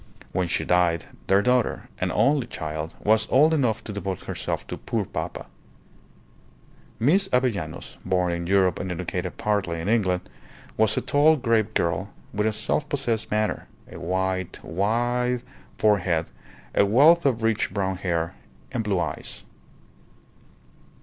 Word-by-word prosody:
When 90 -1 0
she 85 - -1
died, 90 -2 +2 0.2
their 100 +1 +4
daughter, 125 -1 +1
an - - 0
only 140 -4 +2
child, 80 -5 -5
was 110 +1 +3
old 150 +5 +5
enough 125 -7 +1
to 105 - -6
devote 95 -2 -4
herself - - -3
to - - -6
"poor - - -2
papa." - - -5 1.5
Miss 190 - +3
Avellanos, 105 -11 -1
born 90 -1 +1
in 85 0 -3
Europe 95 -2 +3
and 90 0 -3
educated 90 +1 -3
partly 100 -6 0
in 80 - -4
England, 95 -5 +1 0.5
was 110 -1 +2
a - - +2
tall, 150 +3 +4
grave 115 -5 +1
girl, 85 +4 0 0.2
with 105 +1 +1
a - - +2
self 150 +7 -1
possessed 120 -6 -1
manner, 105 0 -1 0.2
a - - -8
wide, 95 0 -1
white 120 +7 0 0.3
forehead, 95 -6 +2 0.4
a - - +4
wealth 145 +11 +6
of 120 -5 +1
rich 110 -4 +1
brown 95 -1 -1
hair, 85 -2 -1 0.4
and 120 -3 -1
blue 100 -4 0
eyes. 85 - -5
100 Hz, 145 wpm, -25 LUFS, 90-120 Hz, 1.5 s, wealth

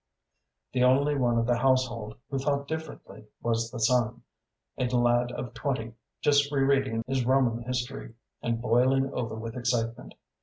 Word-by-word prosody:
The 125 -1 +2
only 140 +3 +4
one 120 -3 +2
of 115 - +2
the 120 0 +1
household 120 -4 +1
who 135 - -1
thought 140 +1 -1
differently 160 -8 -7
was 115 -1 -1
the 120 - -7
son, 120 0 +1 0.5
a 125 - -1
lad 120 0 +2
of 120 -1 -6
twenty, 125 -3 -3 0.3
just 145 0 +3
re 140 -2 +2
reading 135 -4 +1
his 130 -1 0
Roman 125 -2 +2
history, 125 -2 -4 0.3
and 115 -1 -1
boiling 130 +4 +2
over 115 -3 -3
with 115 0 -6
excitement. 120 -2 -2
125 Hz, 155 wpm, -28 LUFS, 115-135 Hz, 0.5 s, only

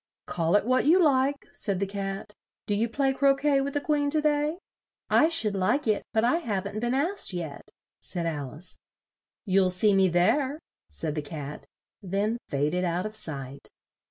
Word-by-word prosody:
"Call 165 +2 0
it 205 - +3
what 255 +3 +2
you 345 +4 +6
like," 280 -3 +2
said 195 -3 -2
the 200 - +1
Cat. 195 +1 -5 0.3
"Do 205 - -1
you 225 +3 +1
play 270 +3 +1
cro 275 0 +4
quet 275 -1 +2
with 280 +1 -4
the 290 - +1
Queen 290 -1 +1
to 310 +2 +1
day?" 300 +1 +1 0.5
"I 315 - +5
should 230 -12 +3
like 195 +10 +1
it, 215 -2 +1
but 220 -1 +1
I 245 +8 +3
haven't 205 - -3
been 240 +3 0
asked 330 - 0
yet," 160 -5 -6 0.3
said 175 -2 -4
Al 145 -5 -4
ice. 170 +4 -7 0.7
"You'll 190 -2 +3
see 200 +3 +3
me 190 -1 +4
there," 260 - +2 0.3
said 155 -2 -4
the 150 - -2
Cat, 145 -1 -8 0.3
then 205 +4 -1
fa 145 +2 0
ded 180 0 -1
out 175 +1 -1
of 215 0 -5
sight. 140 -8 -3
210 Hz, 185 wpm, -27 LUFS, 180-275 Hz, 0.7 s, you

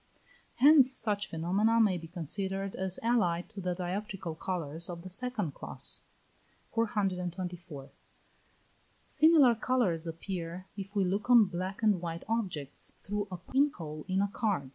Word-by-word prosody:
Hence 275 -1 +7
such 210 -5 +1
phenomena 195 +8 +2
may 210 -5 +4
be 165 - -9
considered 190 +4 -2
as 190 0 0
allied 180 -8 +1
to 205 -3 -8
the 180 -1 -1
dioptrical 185 -1 -4
colours 165 -2 -4
of 170 -1 -7
the 185 - -8
second 210 - -2
class. - - -3 0.7
424. 180 - -2 1.1
Similar 305 -6 +5
colours 220 -9 0
appear 170 +1 -5
if 200 0 -7
we 200 - +3
look 200 +6 -2
on 240 -3 +8
black 185 +3 -5
and 205 -5 +3
white 170 -1 -4
objects, 185 - -2
through 205 0 -3
a 185 - -5
pin 270 - +2
hole 155 -2 -7
in 190 +1 +1
a - - +1
card. 200 - -1
190 Hz, 140 wpm, -31 LUFS, 170-215 Hz, 1.1 s, on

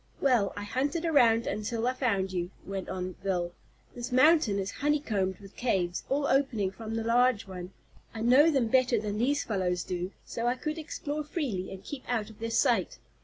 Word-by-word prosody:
"Well, 240 -8 +3
I 205 - -4
hunted 280 +10 -1
around 235 -8 +4
until 225 +2 -2
I 250 - +2
found 200 -8 0
you," 175 -1 -2 0.2
went 195 -1 -5
on 185 0 -4
Bill. 175 -3 -1 0.4
"This 240 0 -6
mountain 260 -5 +5
is 195 0 -2
honeycombed 225 -11 0
with 195 -1 -14
caves, 185 -8 -1
all 280 +1 +1
opening 260 -9 +1
from 225 +2 -6
the 225 - -1
large 240 0 +3
one, 180 -1 -8 0.4
I 220 - -6
know 260 +7 +6
them 270 -7 +2
better 250 -2 +3
than 210 0 -3
these 285 +5 +1
fellows 180 -4 -1
do, 180 +1 -3
so 235 0 -3
I 245 - +2
could 305 +4 -4
explore 300 -1 -4
freely, 270 - -3
and 190 0 -9
keep 275 +2 -7
out 220 -3 -1
of 215 - -17
their 230 0 -3
sight. - - +2
230 Hz, 190 wpm, -29 LUFS, 195-265 Hz, 0.4 s, know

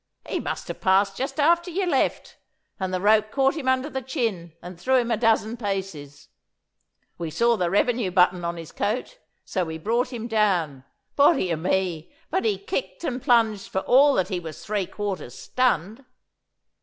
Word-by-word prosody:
'He - - -2
must - - -4
have - - -7
passed 195 +1 +3
just 270 +4 -4
after 340 +4 +3
you 370 +2 -1
left, 295 -7 -1 0.4
and 190 -1 -2
the 185 - -1
rope 215 +2 +3
caught 270 +3 +2
him 305 -5 -5
under 260 +2 +2
the 265 -3 -4
chin 225 - -3
and 175 0 -11
threw 260 +5 +2
him 240 -2 +2
a - - +3
dozen 225 0 +1
paces. 190 - -5 0.9
We 165 -2 -3
saw 235 +9 +2
the 180 -5 0
revenue 225 +2 +1
button 180 -1 +3
on 170 0 -3
his 165 -2 -9
coat, 250 - -3 0.3
so 185 - -1
we 160 -1 -5
brought 235 +9 -1
him 235 -2 -5
down. 180 - 0 0.3
Body 280 - +4
o' - - -2
me, 180 -1 -1 0.2
but 380 +3 0
he 425 -3 +1
kicked 455 -1 -4
and 255 -5 -3
plunged 225 -6 +2
for 190 - -1
all 275 +5 +5
that 185 0 0
he 185 -3 -2
was 160 -3 -9
three 205 -3 -1
quarters 195 - -5
stunned. 240 - -1
215 Hz, 180 wpm, -24 LUFS, 180-255 Hz, 0.9 s, all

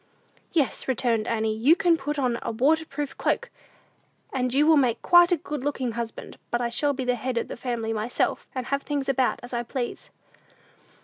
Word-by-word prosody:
"Yes," 300 -6 0
returned 235 -3 0
Annie, 220 -1 0
"you 260 +9 +5
can 345 -2 +3
put 295 -1 -3
on 250 -4 0
a - - -3
waterproof 290 +3 0
cloak, - - 0 0.8
and 255 -1 0
you 285 +4 +3
will 320 0 +6
make 250 -5 +2
quite 350 0 +6
a 350 - +4
good 295 -2 -5
looking 265 -4 -1
husband; 230 0 -6
but 240 - 0
I 240 -1 -1
shall 285 +5 0
be 260 -1 -4
the 250 - +2
head 245 +1 -3
of - - -1
the - - -5
family 235 -3 -3
myself, 220 +3 -1
and 255 -2 -3
have 280 +2 -1
things 285 -2 -3
about 265 -2 +1
as 245 - -9
I 240 - 0
please!" 240 +1 -5
255 Hz, 195 wpm, -26 LUFS, 235-290 Hz, 0.8 s, will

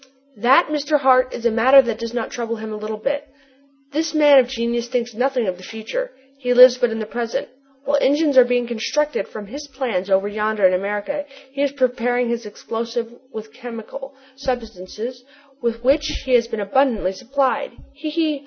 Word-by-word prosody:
"That, 260 +10 +4
Mr. 295 0 +1
Hart, 255 -1 +4
is 235 - -7
a 235 - +4
matter 255 +5 +6
that 235 -4 +1
does 230 -1 -4
not 235 -1 -3
trouble 230 -1 -3
him 220 -1 -7
a - - -4
little 215 +1 -5
bit! 285 +6 -2 0.6
This 315 +2 -2
man 295 -2 +7
of 250 - +3
genius 235 -1 -2
thinks 240 -1 -2
nothing 250 +1 0
of 185 -2 -2
the 185 - -14
future: 230 - -5 0.3
he 250 -2 0
lives 250 0 +9
but 245 - +2
in 225 - -4
the 220 - -3
present. 230 +1 -4 0.4
While 285 0 +2
engines 290 +1 +2
are 255 - +9
being 245 0 0
constructed 240 +2 -1
from 215 -1 -8
his 285 +8 -8
plans 250 -9 -3
over 195 +1 +2
yonder 210 -1 0
in 185 - +5
America, 205 +10 -2 0.3
he 275 +1 -4
is 285 -1 +1
preparing 245 -2 0
his 235 -2 -3
explosive 230 +2 -5 0.2
with 220 -1 -9
chemical 245 +3 -9 0.2
substances 245 -2 -5 0.4
with 235 0 -2
which 290 +3 +1
he 260 - 0
has 235 -1 +4
been 225 -2 -5
abundantly 220 -2 +1
supplied. 265 - -1 0.2
He! 295 +2 -6
he! 310 -2 0
245 Hz, 190 wpm, -21 LUFS, 225-275 Hz, 0.6 s, lives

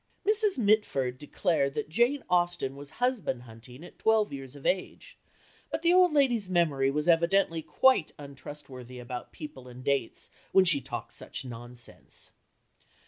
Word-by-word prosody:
Mrs. 425 -3 +3
Mitford 200 - +2
declared 145 -1 0
that 150 - -2
Jane 240 - +2
Austen 175 -6 +1
was 140 0 -10
husband 240 - 0
hunting 120 +4 -13
at 175 - -13
twelve 220 -4 +3
years 135 0 -8
of 140 - -12
age, 195 - -2 0.5
but 320 - -3
the 340 +1 +5
old 365 -1 +6
lady's 245 -9 +2
memory 155 -7 +2
was 150 +3 -1
evidently 170 0 +3
quite 260 0 +3
untrustworthy 140 -3 -10
about 125 0 -7
people 140 -4 -9
and 125 +1 -11
dates 140 -4 -1 0.2
when 190 -1 +6
she 155 -6 +3
talked - - -6
such - - -6
nonsense. 120 0 -7
150 Hz, 145 wpm, -29 LUFS, 135-210 Hz, 0.5 s, old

